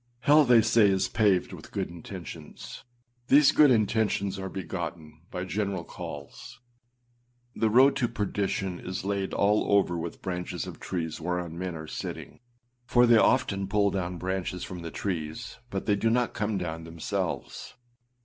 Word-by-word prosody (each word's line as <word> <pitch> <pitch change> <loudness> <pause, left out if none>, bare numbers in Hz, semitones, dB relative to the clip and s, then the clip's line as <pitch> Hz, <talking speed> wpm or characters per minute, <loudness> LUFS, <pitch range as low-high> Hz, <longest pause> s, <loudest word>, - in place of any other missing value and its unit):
Hell, 150 +4 +6
they 120 -3 +6
say, 110 -2 +5
is 95 -1 +1
paved 100 -5 +2
with - - -11
good - - -2
intentions. 85 -2 -9 0.4
These 145 +1 +6
good 150 -2 +6
intentions 110 -4 +1
are 95 0 -4
begotten 85 -4 -6
by 90 - -4
general 100 -1 -2
calls. 120 - -9 1.0
The 110 - +2
road 130 +5 +6
to 125 - +1
perdition 100 -4 -2
is 90 0 -5
laid 100 -1 -1
all 105 +1 +2
over 100 -3 +3
with 85 0 -6
branches 90 -1 -3
of - - -9
trees 80 -3 -4
whereon 90 -1 -3
men 90 0 -4
are 80 0 -7
sitting, - - -7 0.4
for 120 0 +4
they 120 -1 +6
often 105 -6 +2
pull 100 0 +2
down 90 -2 -3
branches 90 0 -3
from 90 - -6
the 85 - -5
trees 90 +4 -4
but 95 -3 -4
they 105 - +3
do 115 +3 +1
not 120 +1 +1
come 105 0 -1
down 80 -3 -4
themselves. 80 0 -4
95 Hz, 160 wpm, -28 LUFS, 90-110 Hz, 1.0 s, Hell